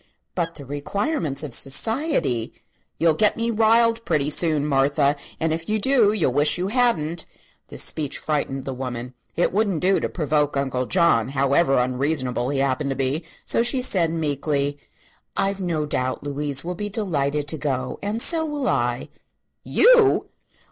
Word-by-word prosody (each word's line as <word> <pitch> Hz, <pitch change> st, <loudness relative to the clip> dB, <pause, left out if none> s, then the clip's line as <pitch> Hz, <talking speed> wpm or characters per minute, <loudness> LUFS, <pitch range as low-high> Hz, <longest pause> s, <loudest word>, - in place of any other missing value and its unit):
"But 170 Hz, -2 st, -2 dB
the 140 Hz, -, -10 dB
requirements 160 Hz, -, -2 dB
of 145 Hz, -5 st, -6 dB
society 135 Hz, -, +1 dB, 0.2 s
" -, -, -45 dB
"You'll 165 Hz, -1 st, +3 dB
get 210 Hz, +6 st, +2 dB
me 230 Hz, +1 st, -1 dB
riled, 230 Hz, +1 st, +3 dB
pretty 150 Hz, -7 st, 0 dB
soon, 155 Hz, -3 st, +1 dB
Martha; 140 Hz, 0 st, +2 dB, 0.2 s
and 160 Hz, 0 st, 0 dB
if 165 Hz, +3 st, -5 dB
you 215 Hz, -, +1 dB
do 230 Hz, -2 st, +3 dB
you'll 180 Hz, -, 0 dB
wish 145 Hz, +5 st, +3 dB
you 185 Hz, +2 st, -2 dB
hadn't." 205 Hz, -10 st, 0 dB, 0.4 s
This -, -, -2 dB
speech 150 Hz, -3 st, -2 dB
frightened 140 Hz, -3 st, -2 dB
the 135 Hz, -, -4 dB
woman. 125 Hz, -1 st, -6 dB, 0.2 s
It 175 Hz, -, +1 dB
wouldn't 200 Hz, -5 st, +1 dB
do 190 Hz, +1 st, +3 dB
to -, -, -2 dB
provoke 150 Hz, -3 st, 0 dB
Uncle 130 Hz, -2 st, -1 dB
John, 170 Hz, -, +3 dB
however 140 Hz, +2 st, +2 dB
unreasonable 125 Hz, 0 st, 0 dB
he 140 Hz, -, -1 dB
happened 135 Hz, +1 st, 0 dB
to 135 Hz, -, -2 dB
be. 135 Hz, +5 st, -1 dB, 0.2 s
So -, -, +2 dB
she 250 Hz, +2 st, +1 dB
said, 180 Hz, -9 st, +2 dB
meekly: 145 Hz, -2 st, -1 dB, 0.6 s
"I've 195 Hz, 0 st, 0 dB
no 165 Hz, -4 st, -1 dB
doubt 130 Hz, -3 st, -2 dB
Louise 145 Hz, -1 st, -2 dB
will 180 Hz, -, -3 dB
be 205 Hz, +4 st, -4 dB
delighted 150 Hz, -8 st, -1 dB
to 160 Hz, -, -4 dB
go, 130 Hz, -3 st, -3 dB
and 210 Hz, +3 st, -1 dB
so 330 Hz, -2 st, +2 dB
will 295 Hz, -4 st, -3 dB
I." 120 Hz, +1 st, -1 dB, 0.5 s
"You!" 475 Hz, -4 st, +4 dB
155 Hz, 165 wpm, -23 LUFS, 135-200 Hz, 0.6 s, You